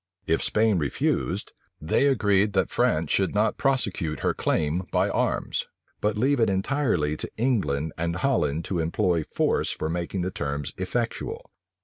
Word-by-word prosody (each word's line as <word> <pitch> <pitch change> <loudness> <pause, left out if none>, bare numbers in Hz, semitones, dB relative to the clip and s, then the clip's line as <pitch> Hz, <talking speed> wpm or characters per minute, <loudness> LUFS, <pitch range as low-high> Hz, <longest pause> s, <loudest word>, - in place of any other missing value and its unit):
If - - +1
Spain 105 -3 +3
refused, 70 -3 -1 0.3
they 80 - +2
agreed 105 -6 +3
that 95 -3 +1
France 80 0 +1
should 95 +1 +1
not 105 +1 +1
prosecute 100 - 0
her - - +1
claim 80 +4 0
by - - +2
arms, - - -1 0.3
but 105 0 0
leave 135 +4 +2
it 115 - +3
entirely 95 - 0
to - - -4
England 95 - 0
and 85 0 -1
Holland 85 - 0
to 90 - -2
employ 85 0 +1
force - - 0
for 80 - -2
making 85 +2 -2
the 95 - -2
terms 70 -3 -3
effectual. 120 - -3
95 Hz, 150 wpm, -26 LUFS, 80-115 Hz, 0.3 s, Spain